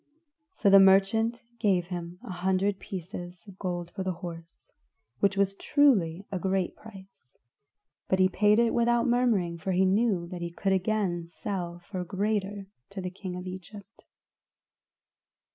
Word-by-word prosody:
So 230 - -1
the 195 - +9
merchant 200 +5 +4 0.2
gave 185 -5 +1
him 175 -1 -5
an - - -7
hundred 190 +2 0
pieces 175 -1 -7
of 195 -1 -13
gold 175 -2 -4
for 195 - -6
the 190 -1 -1
horse 165 -1 -10 0.5
which 200 0 +2
was 195 0 +2
truly 200 - +2
a 190 - -2
great 190 0 -1
price, 195 - -15 0.7
but 190 - +2
he 185 0 +5
paid 210 +3 +3
it 235 -1 +3
without 235 0 +2
murmuring 230 -9 +1
for 190 +3 -2
he 185 +1 +3
knew 195 -2 +2
that 180 -1 -6
he 170 - -3
could 190 +3 -1
again 190 -3 0
sell 175 0 -5
for 190 - -5
a - - -2
greater 200 +1 -2 0.2
to 200 - -7
the 180 -1 -4
king 185 -1 -7
of 180 0 -6
Egypt. 185 +2 -10
190 Hz, 160 wpm, -28 LUFS, 180-205 Hz, 0.7 s, the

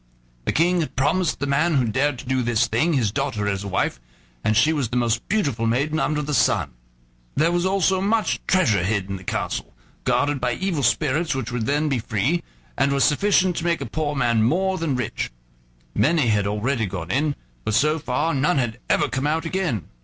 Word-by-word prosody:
The - - +1
King 175 +3 +2
had 160 - -3
promised 155 +6 +1
the 140 - -1
man 150 +4 +2
who 130 -3 +3
dared 130 +5 0
to - - -9
do 130 0 0
this 120 -1 +2
thing 125 +9 +1
his 120 -8 +1
daughter 115 -5 -2
as 100 -1 -1
wife, 95 -10 -1 0.4
and 105 0 +2
she 155 +8 +4
was 140 -7 -1
the 125 - -1
most 115 -1 0
beautiful 140 - 0
maiden 140 +7 0
under 150 -2 0
the 150 +1 -3
sun. 100 - +2 0.6
There 160 +4 +3
was 175 +1 +1
also 190 -1 +2
much 215 +3 +1
treasure 115 - +3
hid 100 0 -1
in 95 - -3
the 95 - -12
castle, 85 - -3 0.3
guarded 145 -1 +1
by 125 -1 +1
evil 180 +1 -2
spirits, 150 +5 +1
which 125 -2 -3
would 120 -2 -2
then 150 +2 +1
be 135 -4 0
free, 125 - 0 0.3
and 140 - +2
was 140 -1 +2
sufficient 185 +2 +3
to - - -2
make 170 -1 +1
a 140 - -4
poor 145 +4 -2
man 120 -4 +2
more 185 +10 +1
than 160 -5 -1
rich. 125 -4 -3 0.6
Many 150 -5 +2
had 105 -2 +2
already 110 +3 -1
gone 90 -2 -5
in, 145 +4 +1 0.3
but 110 - 0
so 150 +5 +2
far 150 +4 -1
none 145 +5 +1
had 120 -3 -1
ever - - +3
come 130 +2 -2
out 160 +2 0
again. 160 - -2
140 Hz, 205 wpm, -23 LUFS, 115-160 Hz, 0.6 s, she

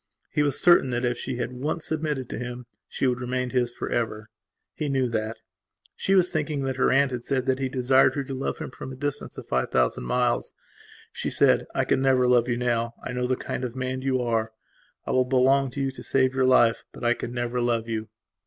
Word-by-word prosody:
He - - +1
was 145 -1 +1
certain 175 -6 +5
that 120 0 -1
if 120 -1 -1
she 130 - -4
had 125 0 -3
once 150 +6 -3
submitted 150 -5 -2
to - - -4
him 125 0 -6 0.2
she - - -2
would 125 -1 +1
remain 125 0 -2
his 125 -2 +1
for - - -5
ever. 110 -2 -2 0.4
He 150 -2 -3
knew 135 -2 +1
that. 110 0 -3 0.5
She 195 - +1
was 180 -2 +4
thinking 150 -2 -1
that 130 -1 -2
her - - +3
aunt 135 0 +3
had 120 -1 -4
said 130 -1 -1
he 135 - -1
had 130 - -3
desired 130 0 +4
her 140 - -1
to 135 - -6
love 135 +1 -3
him - - -6
from 130 - -8
a - - -7
distance 145 +2 -4
of - - -7
five 65 -1 0
thousand 60 -1 +1
miles. - - 0 0.6
She - - -3
said: - - +3
"I - - +1
can 130 - +1
never 130 -2 +3
love 125 -1 +4
you 120 -1 0
now 120 -1 -1
I - - -4
know 125 0 -1
the 130 - +1
kind 125 - -5
of 125 -1 -4
man 130 0 -3
you 130 -1 0
are. 115 -2 -1 0.5
I - - -2
will 130 - +4
belong 135 +1 +3
to 140 - -7
you 135 0 0
to 130 - -11
save 130 -1 +2
your 130 -1 +2
life. 120 -3 +4
But - - -11
I 120 0 +4
can 120 - -6
never 120 0 -2
love 115 -1 0
you." 110 -1 -3
125 Hz, 235 wpm, -25 LUFS, 120-135 Hz, 0.6 s, certain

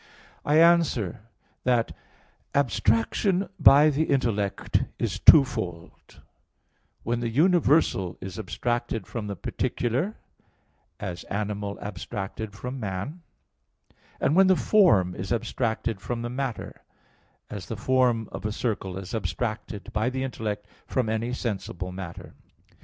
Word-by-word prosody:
I 150 +1 +3
answer 165 - +3 0.4
that, 120 -2 +1 0.6
Abstraction 140 - +1
by 150 +2 +7
the 150 +3 +1
intellect 115 -9 0
is 100 -5 -2
twofold 110 - +3 0.8
when 120 +1 -1
the 120 -1 -1
universal 150 - +3
is 95 +1 -7
abstracted 120 +2 -2
from 110 -3 -5
the 100 - -4
particular, 125 - -2 0.8
as 90 -3 -5
animal 100 0 -3
abstracted 100 +2 -5
from 125 +6 -6
man; 105 - -4 1.0
and 150 - +2
when 190 +1 +6
the 185 - +5
form 105 - +4
is 95 +2 -6
abstracted 115 -2 -1
from 120 +1 -3
the 120 - -4
matter, 130 -2 -4 0.7
as 100 -3 -6
the 115 - -5
form 120 -1 +2
of - - -7
a 105 - -1
circle 105 -5 -3
is 95 -1 -7
abstracted 105 +1 -4
by 110 +4 +1
the 130 0 -3
intellect 105 -5 -4 0.2
from 125 -4 0
any 110 +2 -1
sensible 95 -7 -4
matter. 90 -2 -8
115 Hz, 120 wpm, -26 LUFS, 100-130 Hz, 1.0 s, by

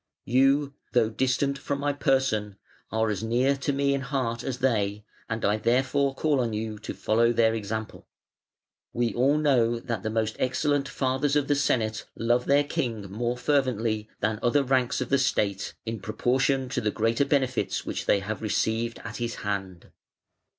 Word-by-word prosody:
You, 135 +3 +3 0.2
though 115 -2 +3
distant 130 +3 0
from 140 0 -3
my 145 0 0
person, 130 -8 +1 0.4
are 110 0 +1
as 100 - -3
near 125 +5 +2
to 135 +2 -1
me 140 0 +1
in 140 - -1
heart 125 -4 -2
as 130 -2 -3
they, 105 -5 0 0.2
and 115 0 -2
I 105 +1 +2
therefore 130 +4 +1
call 145 0 +1
on 120 -3 0
you 110 0 -4
to 105 - -6
follow 115 +2 +2
their 115 -1 +3
example. 110 0 -5 0.9
We 120 -1 0
all 135 +5 +3
know 120 -6 +2
that 115 -4 -4
the 110 - -2
most 110 0 -1
excellent 140 +2 0
fathers 135 +2 0
of 145 -2 +2
the 145 - +3
Senate 115 -6 0
love 120 +2 +1
their 140 +1 +4
King 115 -8 -3
more 120 +4 -2
fervently 115 -6 0
than 110 0 0
other 130 +4 +3
ranks 130 -1 +1
of 125 - -3
the 140 - +3
State, 100 -6 0
in 115 -1 -4
proportion 130 +6 0
to - - -1
the 105 - +1
greater 115 +5 +1
benefits 130 -3 0
which - - -4
they 100 - +3
have 105 +3 -4
received 110 +2 0
at 115 -1 -6
his 120 -1 -3
hand". 95 -4 -4
120 Hz, 175 wpm, -26 LUFS, 110-135 Hz, 0.9 s, their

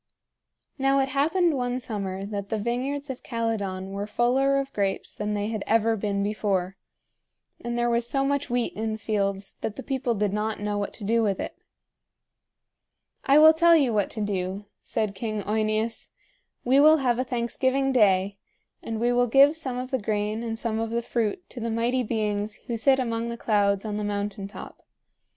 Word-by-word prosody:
Now 270 +1 +3
it 270 0 +1
happened 315 +5 +2
one 250 -1 -1
summer 195 -5 -4
that 200 -1 -5
the 220 - -1
vineyards 265 +6 -2
of 255 - -8
Calydon 205 -5 -3
were 200 +1 -4
fuller 260 +5 +2
of 275 0 -3
grapes 195 -2 -1
than 210 0 -3
they 205 +1 -2
had 220 -2 -3
ever 225 0 +3
been 200 -1 -1
before, 195 -3 -1 0.9
and 240 0 -3
there 240 0 +1
was 235 0 +1
so 275 -1 +1
much 280 0 0
wheat 245 -1 0
in 220 +1 -2
the - - -4
fields 200 -2 -2
that 210 - -3
the - - -7
people 260 -3 -1
did 205 -1 0
not 215 +1 -2
know 205 0 -2
what 200 - -3
to 215 - -10
do 230 +3 +2
with 200 -4 0
it. - - -5 1.7
"I 275 +1 +5
will 315 +1 +9
tell 335 +1 +5
you 275 -7 +3
what 205 -2 +1
to 220 - -5
do," 195 0 -2 0.2
said 215 -3 -2
King 215 0 -3
OEneus. 215 +2 -1 0.5
"We 260 +3 +4
will 310 +2 +7
have 250 -4 +1
a - - +2
thanksgiving 260 +2 0
day, 200 -4 +3 0.4
and 225 -1 -4
we 240 +1 +2
will 245 0 +3
give 275 +5 +6
some 265 -6 -4
of 255 +1 -5
the 260 -3 0
grain 210 +1 -1
and 225 -1 -3
some 225 -1 -2
of 225 0 -2
the 235 +1 -1
fruit 235 - -2
to 245 - -6
the 230 0 -2
Mighty 235 +3 +1
Beings 210 -2 -1
who 235 - -3
sit 265 +4 +4
among 230 -2 -2
the 235 - -5
clouds 200 -2 +1
on 210 -1 -3
the 210 - -2
mountain 205 -1 -3
top. 200 - -11
225 Hz, 195 wpm, -26 LUFS, 205-255 Hz, 1.7 s, will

